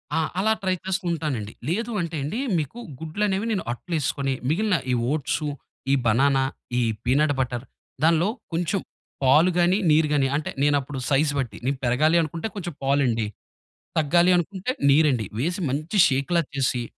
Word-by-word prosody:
ఆ! - - +2 0.2
అలా 220 +3 +2
ట్రై 185 -1 +2
చేసుకుంటానండి. 165 - -2 0.2
లేదు 230 +6 -1
అంటే 165 -1 -4
అండి 205 - -3 0.2
మీకు 155 - -3 0.2
గుడ్లనేవి 195 +6 -1
నేను 195 - -1
అట్లేసుకొని, 140 -2 -2 0.2
మిగిలిన 205 +4 +2 0.2
ఈ - - +2 0.2
ఓట్సు 150 0 -1 0.4
ఈ - - +4
బనానా, 135 +4 +3 0.4
ఈ - - +2 0.2
పీనట్ 145 +4 +2
బటర్ 125 0 -2 0.4
దానిలో 165 +4 +4 0.2
కొంచెం 175 +3 0 0.4
పాలు 155 +7 +5
గాని, 175 +3 +4
నీరు 155 0 +4
గాని 135 -2 +3
అంటే 150 - -2
నేనప్పుడు 145 -2 +1
సైజ్ 145 +2 +3
బట్టి. 115 -6 -3
నేను 135 0 0
పెరగాలి 155 +8 +3
అనుకుంటే 165 +6 -3
కొంచెం 175 -5 -5
పాలండి. 130 -6 +1 0.7
తగ్గాలి 170 +4 +4
అనుకుంటే 190 +6 -2 0.2
నీరండి. 135 -7 +3
వేసి 175 +6 -1
మంచి 155 +9 -3
షేక్‌లా 140 +6 +1
చేసి 130 -3 0
155 Hz, 145 wpm, -24 LUFS, 135-175 Hz, 0.7 s, పాలు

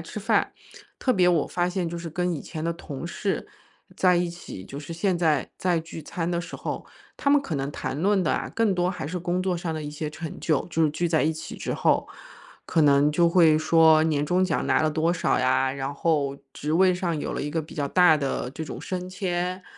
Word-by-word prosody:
吃 - - -7
饭。 - - +1 0.5
特 255 - +2
别 180 -3 +4
我 170 -4 +2
发 175 0 0
现 180 -1 -2
就 170 0 -5
是 170 -1 -6
跟 180 +2 -1
以 150 - -4
前 155 0 -6
的 170 - 0
同 160 -2 -7
事 195 - -2 0.5
在 180 -1 +4
一 175 0 +1
起， 170 - -9
就 140 - -8
是 150 +3 -7
现 180 +2 0
在 155 -5 +1
在 180 -2 +1
聚 165 0 -9
餐 165 +2 -3
的 170 0 0
时 175 - -8
候， - - -5 0.3
他 280 - -1
们 290 0 +5
可 170 - -4
能 135 +1 -2
谈 140 +1 -4
论 195 +1 +3
的 170 - +1
啊， - - -2
更 220 -4 +2
多 175 0 +1
还 165 -7 -5
是 180 +3 -3
工 175 +2 -1
作 185 -2 0
上 170 -1 -3
的 155 - -4
一 150 - -5
些 150 +1 -4
成 160 +1 -7
就， 155 -4 +1
就 165 0 +1
是 150 - +2
聚 170 +3 -1
在 160 -1 +2
一 160 - +2
起 155 - -8
之 - - -3
后。 - - +2 0.6
可 160 - +3
能 145 0 +5
就 170 +2 +4
会 165 -3 +5
说 160 0 +5
年 150 -2 +1
终 180 +2 +2
奖 - - -1
拿 - - +3
了 155 - +2
多 160 +2 +1
少 - - +1
呀， 130 +1 +2
然 135 0 -4
后 140 -3 0 0.2
职 150 - -4
位 185 +3 +5
上 180 -2 -1
有 - - -3
了 - - -3
一 145 - -3
个 160 +1 -2
比 155 - -12
较 145 - 0
大 175 +1 +5
的 135 -3 -2
这 160 +3 -6
种 - - -7
升 185 -1 -4
迁， 180 0 -2
165 Hz, 260 characters per minute, -25 LUFS, 150-180 Hz, 0.6 s, 们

